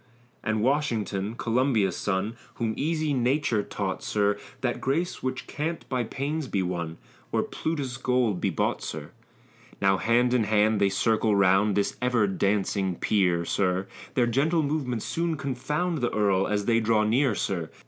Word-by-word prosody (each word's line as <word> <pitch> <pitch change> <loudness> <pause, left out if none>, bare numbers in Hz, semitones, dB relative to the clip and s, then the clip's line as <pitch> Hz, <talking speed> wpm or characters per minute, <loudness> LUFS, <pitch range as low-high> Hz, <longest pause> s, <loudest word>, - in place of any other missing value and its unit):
And 110 -1 0
Washington, 115 -7 0
Columbia's 120 -4 +1
son, 105 +3 -1 0.2
Whom 115 -2 -1
easy 155 0 0
nature 125 -3 +1
taught, - - -4
sir, 105 -1 +1 0.3
That 120 -2 -1
grace 160 +7 -1
which 130 0 -3
can't 160 +3 -4
by 125 -2 0
pains 140 +5 -3
be 100 -5 0
won, 85 -2 -3 0.3
Or - - +1
Plutus's 140 -6 -3
gold 125 -7 +1
be - - +1
bought, - - -1
sir. - - -6 0.7
Now 95 0 +3
hand 120 +4 +2
in 120 -4 +3
hand 105 0 +2
they 100 - +4
circle 110 +2 +2
round 100 +1 +4
This 100 - 0
ever 125 -4 +2
dancing 95 -1 0
peer, 90 -3 +1
sir; 95 0 0 0.3
Their 125 - +4
gentle 150 +7 +2
movements 140 -6 -2
soon 165 -1 -1
confound 150 +5 -2
The 120 -2 0
earl 100 -3 +2
as 105 -1 -1
they 115 -1 +3
draw 110 -1 +2
near, 120 +2 +2
sir. 85 -6 -2
115 Hz, 160 wpm, -26 LUFS, 100-135 Hz, 0.7 s, they